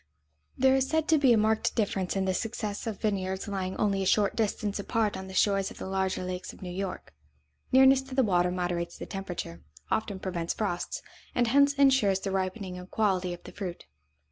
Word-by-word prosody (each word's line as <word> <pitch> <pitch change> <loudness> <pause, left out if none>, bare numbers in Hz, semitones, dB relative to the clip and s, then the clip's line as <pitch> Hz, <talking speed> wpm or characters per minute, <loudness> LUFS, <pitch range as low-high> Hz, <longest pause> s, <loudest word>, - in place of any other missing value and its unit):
There 265 +1 +5
is 265 0 +1
said 320 -1 +1
to 315 -2 +5
be 270 -3 +5
a 230 - +6
marked 220 +1 +1
difference 195 -4 0
in 195 -1 0
the 190 - +1
success 215 +1 -3
of 215 -4 -4
vineyards 190 -2 -1
lying 190 -2 -3
only 200 -2 +1
a - - -1
short 205 0 +3
distance 210 -2 -1
apart 215 +1 0
on 190 - -6
the 190 - -9
shores 195 -1 +2
of - - -12
the - - -6
larger 190 -1 -1
lakes 180 0 -5
of - - -13
New 180 - -5
York. 190 - -5 0.6
Nearness 265 +1 +6
to 260 - -6
the 265 - +4
water 180 -4 +2
moderates 175 -1 -2
the - - -6
temperature, 175 - -6 0.3
often 210 -3 0
prevents 175 -3 -3
frosts, 180 -5 -3 0.3
and 245 - +3
hence 280 +3 +5
insures 265 -9 +4
the 195 - -3
ripening 185 -1 -3
and 180 +1 -11
quality 190 -4 +1
of 175 - -8
the - - -10
fruit. 185 -4 -6
195 Hz, 205 wpm, -28 LUFS, 185-220 Hz, 0.6 s, a